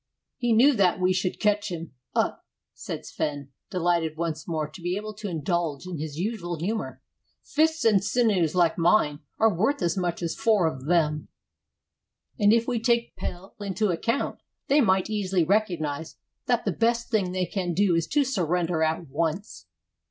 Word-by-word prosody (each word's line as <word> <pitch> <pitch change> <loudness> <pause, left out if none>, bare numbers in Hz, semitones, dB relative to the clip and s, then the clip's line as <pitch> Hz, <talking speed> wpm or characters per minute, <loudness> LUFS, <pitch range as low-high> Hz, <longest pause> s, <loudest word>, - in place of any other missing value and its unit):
"He 240 -1 0
knew 250 +6 +6
that 185 -2 +3
we 185 0 +3
should 185 -1 -1
catch 210 0 +1
him 165 -3 -6 0.2
up," - - 0 0.3
said - - -6
Sven, 145 -2 -3 0.2
delighted 170 -3 0
once 160 -2 -3
more 155 -3 -1
to 155 +4 -13
be 175 +1 -1
able 215 +1 -5
to 210 0 -6
indulge 165 -2 -2
in 180 -4 -5
his 150 -1 -5
usual 175 -3 -3
humor. 215 +8 -3 0.4
"Fists 320 0 +1
and 205 -4 +4
sinews 205 -8 +2
like 175 -1 +3
mine 165 -4 +3 0.2
are 220 -1 +4
worth 220 - +1
as 170 -1 +1
much 175 -2 -2
as 165 - -1
four 215 -6 +2
of 130 -5 -3
them; 150 -2 +1 1.1
and 205 -1 +5
if 230 +1 +3
we 245 -2 0
take 235 +1 +1
Pelle 180 +2 -6
into 205 +1 -1
account, 230 +10 -1 0.3
they 290 +2 +5
might 190 -5 +3
easily 195 -4 +1
recognize 160 -5 -1 0.3
that 245 -1 +1
the - - +1
best 235 +1 0
thing 200 -5 +1
they 185 0 0
can 180 -3 -3
do 195 -1 +3
is 165 0 +1
to 295 - +2
surrender 180 - 0
at 160 +1 0
once." 155 - -3
180 Hz, 175 wpm, -26 LUFS, 165-215 Hz, 1.1 s, knew